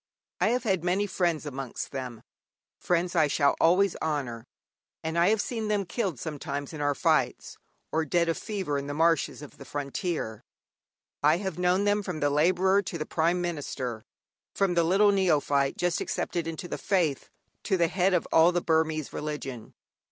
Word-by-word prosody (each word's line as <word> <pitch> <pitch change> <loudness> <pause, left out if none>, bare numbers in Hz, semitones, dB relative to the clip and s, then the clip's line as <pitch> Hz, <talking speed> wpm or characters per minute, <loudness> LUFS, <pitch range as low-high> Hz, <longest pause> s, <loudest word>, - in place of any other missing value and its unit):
I - - +3
have 245 +3 +1
had 190 -7 0
many 185 +3 +1
friends 175 -5 -1
amongst 135 -3 -5
them, 125 -4 -6 0.6
friends 175 0 0
I 155 -3 +4
shall 140 0 +2
always 185 +3 +4
honour; 135 -7 -3 0.6
and 160 +1 -3
I 170 +2 +4
have 220 0 +2
seen 225 0 -2
them 205 -2 0
killed 180 - -2
sometimes 145 -1 -5
in 150 - -5
our 145 -1 +1
fights, - - 0 0.3
or 160 +1 +1
dead 170 +3 +1
of 165 - +1
fever 190 -9 -3
in 140 - -6
the 145 - -4
marshes 165 -1 +1
of 145 - -13
the - - -8
frontier. 145 - -4 0.8
I 150 +3 +4
have 190 -3 -4
known 180 +2 +2
them 205 0 +2
from 180 -5 -5
the 145 -1 +1
labourer 185 +6 +3
to 180 -3 -5
the 155 - -3
Prime 170 +2 +1
Minister, 135 -9 -4 0.5
from 195 -2 +2
the 170 -1 +3
little 195 +5 +4
neophyte 145 -7 +2
just 175 -1 0
accepted 170 -2 -2
into 165 +2 -5
the - - -5
faith 170 -8 0 0.4
to 190 - +2
the 170 -1 +3
head 185 +2 +2
of 175 - 0
all 165 +2 +6
the 175 - +1
Burmese 160 -2 0
religion. 140 -6 -6
165 Hz, 180 wpm, -27 LUFS, 145-185 Hz, 0.8 s, all